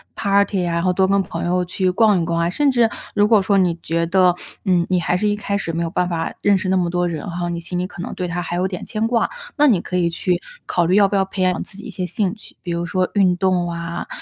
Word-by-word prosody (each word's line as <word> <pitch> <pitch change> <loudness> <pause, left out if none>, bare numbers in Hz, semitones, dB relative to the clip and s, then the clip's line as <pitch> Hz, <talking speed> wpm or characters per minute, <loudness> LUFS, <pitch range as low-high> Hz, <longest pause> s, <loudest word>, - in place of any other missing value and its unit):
Party 200 -2 +1
啊， 170 - -1
然 170 - +1
后 185 - +3
多 190 +1 +2
跟 200 0 +3
朋 - - -5
友 180 +1 +1
去 185 +1 0
逛 205 -2 +3
一 - - -1
逛 170 0 -1
啊。 170 +1 +1
甚 290 +8 +2
至， 235 -3 +3 0.3
如 205 0 +4
果 215 -2 +5
说 200 +1 +2
你 175 -3 +2
觉 170 +1 0
得， 180 0 +3 0.3
嗯， 180 -3 +3
你 185 -1 +2
还 175 +1 0
是 210 - 0
一 205 - +1
开 200 -1 -2
始 165 - -3
没 170 +1 -1
有 165 - -2
办 180 +1 0
法 165 -1 -2
认 200 -1 +4
识 185 0 -3
那 190 - +3
么 175 -2 +1
多 175 0 0
人 170 +3 -4
哈， 175 0 -3
你 170 0 -3
心 175 +1 -5
里 180 - -1
可 175 - -9
能 - - -5
对 180 - -3
他 175 +1 -3
还 175 0 -4
有 185 +2 +1
点 180 -2 -6
牵 215 0 -2
挂， 235 -1 +1 0.3
那 295 0 +5
你 210 -9 +4
可 180 - -3
以 170 -1 +2
去 175 +1 -1 0.2
考 175 -1 +1
虑 185 +3 +2
要 205 -1 +6
不 200 - -2
要 195 - +3
培 190 0 -5
养 180 -1 +1
自 190 - -12
己 205 - -10
一 - - -7
些 185 - -4
兴 190 0 -1
趣， 215 - -14
比 175 - -4
如 170 0 -2
说 185 0 0
运 190 -3 +3
动 180 -2 +1
啊， 170 0 -5
180 Hz, 335 characters per minute, -20 LUFS, 175-200 Hz, 0.3 s, 要